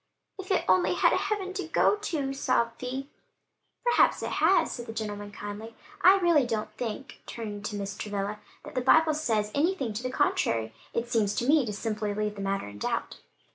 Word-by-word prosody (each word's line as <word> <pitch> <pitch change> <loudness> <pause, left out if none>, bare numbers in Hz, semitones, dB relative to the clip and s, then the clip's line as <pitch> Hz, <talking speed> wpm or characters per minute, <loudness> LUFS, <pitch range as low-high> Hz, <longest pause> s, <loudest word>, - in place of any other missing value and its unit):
"If 385 - -7
it 380 - +2
only 185 -1 +3
had - - +4
a - - +3
heaven 400 -2 -2
to 380 -4 -4
go 330 - +3
to," 315 -10 -2
sobbed 235 -3 0
Vi 260 +2 -4 0.8
"Perhaps 485 -1 +3
it - - -3
has," - - +3
said 240 -1 -6
the 225 - -6
gentleman 205 -2 -5
kindly. 205 +2 -7 0.3
"I 375 +2 +8
really 340 -8 +3
don't 220 -2 -2
think," 245 +3 -6
turning 210 -3 -6
to 210 +1 -4
Mrs. 200 0 -5
Travilla, 205 0 -3 0.3
"that - - -9
the 255 - 0
Bible 315 +5 +5
says 220 -9 0
anything 290 - 0
to 210 - -4
the 255 - -2
contrary; 115 - +1 0.2
it 235 +1 -2
seems 210 -4 +2
to 240 - -1
me 290 -4 +4
to 210 - -3
simply 210 -1 -2
leave 210 0 -1
the 200 - -7
matter 195 - -1
in 105 0 -10
doubt." - - -2
230 Hz, 200 wpm, -28 LUFS, 205-290 Hz, 0.8 s, I